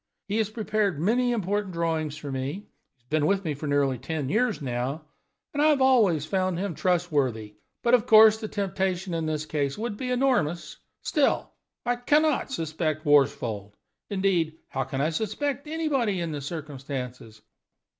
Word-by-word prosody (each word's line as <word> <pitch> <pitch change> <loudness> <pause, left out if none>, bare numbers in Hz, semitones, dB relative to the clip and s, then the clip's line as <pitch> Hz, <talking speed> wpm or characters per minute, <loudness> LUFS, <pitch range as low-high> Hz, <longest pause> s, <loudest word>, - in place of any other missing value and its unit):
He 205 +2 -1
has 220 -2 +1
prepared 215 -6 -1
many 245 +8 +2
important 205 -3 -1
drawings 160 -3 -1
for 145 - -6
me 135 +1 -2
(he - - -5 0.4
has 125 -3 -40
been 155 -1 +2
with 195 +1 +1
me 155 -3 -1
nearly 145 -4 +1
ten 155 -2 -3
years 225 - +1
now), 135 +3 -3 0.5
and 290 - 0
I 305 - +5
have 300 -3 +4
always 220 - +4
found 185 +1 0
him 195 0 -2
trustworthy. 145 - 0 0.3
But, 235 - +2
of 245 -1 +4
course, 220 0 +8
the 220 - -4
temptation 190 -3 -2
in 165 -1 -1
this 155 -1 -2
case 145 -3 -2
would 215 -1 -3
be 255 +2 -4
enormous. 245 - 0 0.3
Still, 295 -4 +1 0.3
I 245 0 +1
can 295 +5 +3
not 305 -3 0
suspect 160 - -2
Worsfold. 115 -8 +2 0.3
Indeed, 185 -6 +1
how 135 -1 -2
can 135 0 -3
I 155 +3 +1
suspect 275 - -2
anybody 280 - 0
in 170 -2 -2
the 145 -2 -4
circumstances?" 135 -7 -6
175 Hz, 165 wpm, -26 LUFS, 145-220 Hz, 0.5 s, course